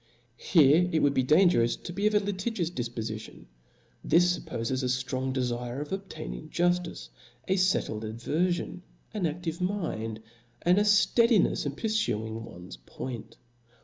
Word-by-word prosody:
Here 160 +2 +5
it 160 - +2
would 145 -1 +4
be 130 - +2
dangerous 150 -4 +4
to 175 - -8
be 200 +3 +1
of 215 - +1
a - - +6
litigi 205 +3 -3
pus 170 -3 -1
difpofition; 115 -5 -5 0.6
this 175 +1 +3
fuppofes 125 +3 -3
a - - -1
ftrong 130 +1 -1
defire 125 -1 -2
of 145 0 -6
obtaining 190 -5 -6
juftice, 175 - 0 0.4
a 190 - +2
fettled 185 - +1
averfion, 155 +12 -2 0.3
an 205 -5 -1
aftivc 165 +1 -3
mind, 160 - -2 0.4
and 180 +3 +4
a - - +3
fteadinefs 210 - +3
in 140 - -3
purfuing 115 - -1
one's 90 -6 -10
point. 125 -4 -8
155 Hz, 145 wpm, -28 LUFS, 120-185 Hz, 0.6 s, a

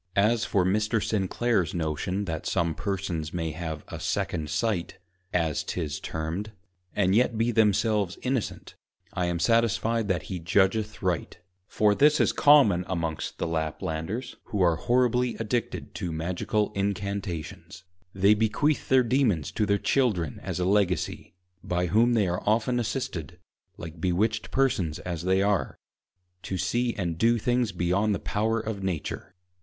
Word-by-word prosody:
_ - - -51
As 110 +3 +3
for 95 -3 +1
Mr. 110 +4 +1
Sinclare's 105 -1 0
Notion 85 +5 -2
that 80 -4 -4
some 85 -1 +1
Persons 90 -4 -3
may 80 -2 -2
have 80 -1 -5
a - - -7
second 75 -2 -2
Sight, 105 -2 -1 0.3
(as 80 -4 0
'tis 75 -4 -3
termed) 85 +7 -4 0.4
and 95 -2 +2
yet 120 +1 +2
be 115 +2 +2
themselves 105 -3 +2
Innocent, 130 -3 -2 0.4
I 90 -1 0
am 85 0 -1
satisfied 115 +2 +2
that 90 -6 0
he 95 - -5
judgeth 100 +6 +1
right; 90 -4 -1 0.3
for 105 -1 +3
this 150 +6 +4
is - - +3
common 135 -12 +5
amongst 85 -4 -3
the - - -2
Laplanders, 80 - -3
who 105 - -4
are 85 -2 +4
horribly 125 +5 +1
addicted 115 +2 -3
to 90 - -4
Magical 90 +6 -1
Incantations: 100 -3 -4 0.3
They 100 +2 +4
bequeath 115 +8 +1
their 130 -1 +5
Dæmons 115 - +1
to 105 - 0
their 100 - +3
Children 100 - 0
as - - -4
a 90 - +1
Legacy, 95 -3 0 0.3
by 90 0 0
whom 115 +7 +3
they 105 -4 +3
are 90 +1 -2
often 115 +3 +2
assisted 110 - -4 0.4
(like 80 0 -9
Bewitched 105 +5 0
Persons 105 - +1
as 85 -3 -5
they 95 +1 +3
are) 100 -2 0 0.6
to 95 - -4
see 120 +7 0
and 85 -4 -3
do 115 +1 +4
things 120 0 +1
beyond 95 +4 +1
the - - -4
Power 110 +2 0
of 110 -2 -4
Nature. 95 -5 -4
100 Hz, 150 wpm, -27 LUFS, 85-110 Hz, 0.6 s, common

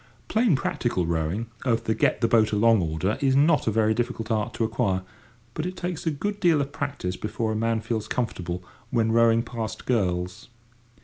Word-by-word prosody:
Plain 220 - +3
practical 120 -8 -1
rowing 85 +6 -1 0.2
of 115 -4 +1
the 110 - +1
get - - +1
the 115 - +4
boat 110 -2 +3
along 110 0 +4
order 80 +5 -1
is 135 -1 +3
not 150 +1 +4
a - - +3
very 110 0 +3
difficult 115 -1 -2
art 110 -2 0
to - - 0
acquire, 110 -5 0 0.5
but 155 +6 -3
it 185 0 -6
takes 175 -2 -4
a - - +5
good 200 +8 -3
deal 170 -5 +4
of 140 0 -2
practice 140 -11 -3
before 110 +2 -2
a - - -2
man 115 0 0
feels 110 -2 -3
comfortable, 90 -8 -3 0.3
when 115 -2 +1
rowing 115 0 +4
past 110 -2 -5
girls. 90 -7 -1
115 Hz, 190 wpm, -25 LUFS, 105-135 Hz, 0.5 s, a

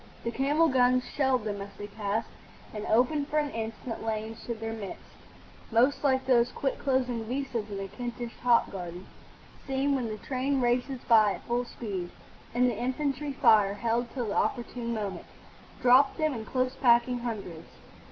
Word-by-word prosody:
The 235 - -2
camel 290 +6 +3
guns 255 -2 +3
shelled 265 -4 +2
them 205 -2 -3
as 200 - -6
they 205 - -6
passed 210 +1 -3 0.4
and 210 -1 -5
opened 255 +6 +2
for 305 - -1
an 295 -1 +1
instant 225 +1 -5
lanes 220 0 -4
through 235 - -3
their 225 0 -5
midst, 205 -4 -7 0.7
most 250 +7 +3
like 265 -2 +2
those 245 -2 +4
quick 270 - -2
closing 250 -4 0
vistas 245 -3 -3
in 200 -1 -5
a 195 - -4
Kentish 240 +3 -6
hop 240 -1 +3
garden 180 -1 -7 0.6
seen 270 +1 +1
when 255 -4 0
the 215 -1 -4
train 265 +5 -1
races 245 +1 0
by 215 -4 +6
at - - -9
full 240 +1 -1
speed; 195 -7 -5 0.4
and 250 +1 +3
the 240 - 0
infantry 275 +4 -2
fire, 215 -6 +5
held 235 +2 0
till 240 -4 -3
the - - -2
opportune 240 -1 -1
moment, 210 -4 -4 0.6
dropped 255 +3 +6
them 310 -2 +1
in 225 -3 -5
close 255 +2 -1
packing 240 0 +4
hundreds. 205 -9 -5
240 Hz, 170 wpm, -29 LUFS, 220-260 Hz, 0.7 s, by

